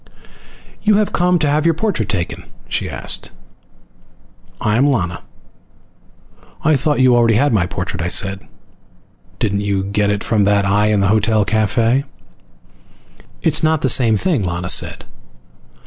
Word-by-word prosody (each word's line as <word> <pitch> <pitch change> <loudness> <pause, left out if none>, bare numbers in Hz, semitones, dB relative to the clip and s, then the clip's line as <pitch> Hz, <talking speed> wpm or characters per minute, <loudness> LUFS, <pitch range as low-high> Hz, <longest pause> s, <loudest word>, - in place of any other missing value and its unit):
"You 210 -1 +2
have 210 0 0
come 180 0 +2
to 155 - 0
have 150 +1 +1
your 165 -1 +2
portrait 170 - -2
taken?" 90 -4 -4 0.2
she - - -3
asked. - - -1 1.3
"I 105 0 0
am 135 +5 +3
Lana." 90 -11 -1 1.4
"I 155 -1 +3
thought 145 +2 0
you 130 -1 +4
already 115 -2 +3
had 140 +3 +2
my 90 -5 +1
portrait," 90 -1 -5
I 85 - -2
said. 95 +1 0 1.0
"Didn't 100 -1 -1
you 100 -1 -1
get 100 +1 -1
it 105 0 -2
from 110 -3 +1
that 100 0 +2
eye 105 +2 +2
in 105 -2 +1
the 100 - +1
hotel 110 0 +2
cafe?" 115 +5 +1 1.4
"It's - - +3
not 160 -1 +1
the 130 - +2
same 115 -3 +4
thing," 160 - 0
Lana 90 -1 -3
said. - - +1
110 Hz, 150 wpm, -17 LUFS, 100-140 Hz, 1.4 s, you